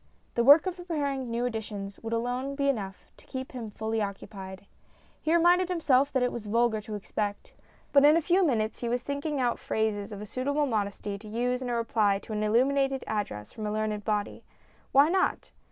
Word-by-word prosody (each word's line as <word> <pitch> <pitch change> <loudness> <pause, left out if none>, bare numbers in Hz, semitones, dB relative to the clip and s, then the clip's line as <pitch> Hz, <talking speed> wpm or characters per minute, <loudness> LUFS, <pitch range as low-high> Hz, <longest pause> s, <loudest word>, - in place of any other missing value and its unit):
The 235 - +2
work 285 +7 +8
of 370 -1 -3
preparing 285 -7 -2
new 235 +1 -1
editions 210 -4 -5
would 225 - -6
alone 245 +4 -2
be 280 0 0
enough 195 -7 -4
to - - -19
keep 260 0 -6
him 235 -4 -6
fully 220 +1 -2
occupied. 195 -1 -6 0.6
He 310 - 0
reminded 350 +2 +4
himself 285 -6 +3
that 260 -2 +1
it 250 - +1
was 225 -3 -6
vulgar 230 0 +2
to 215 0 -6
expect; 205 0 -4 0.4
but 280 -1 +7
in 300 +2 +7
a - - +2
few 365 +4 +3
minutes 225 -9 0
he 240 - -2
was 245 +1 -1
thinking 285 +1 -2
out 245 -2 +1
phrases 215 -1 -1
of 205 - -6
a 210 - -6
suitable 285 +7 0
modesty 205 -4 -2
to 215 - -12
use 245 +3 -1
in 250 - -3
a 240 - 0
reply 220 -3 +2
to 215 - -8
an 210 - -1
illuminated 270 +5 +2
address 190 - -4
from 215 -1 -4
a - - -2
learned 215 -1 -2
body. 210 -1 -2 0.5
Why 280 +2 +6
not? 375 +3 0
235 Hz, 200 wpm, -28 LUFS, 210-280 Hz, 0.6 s, work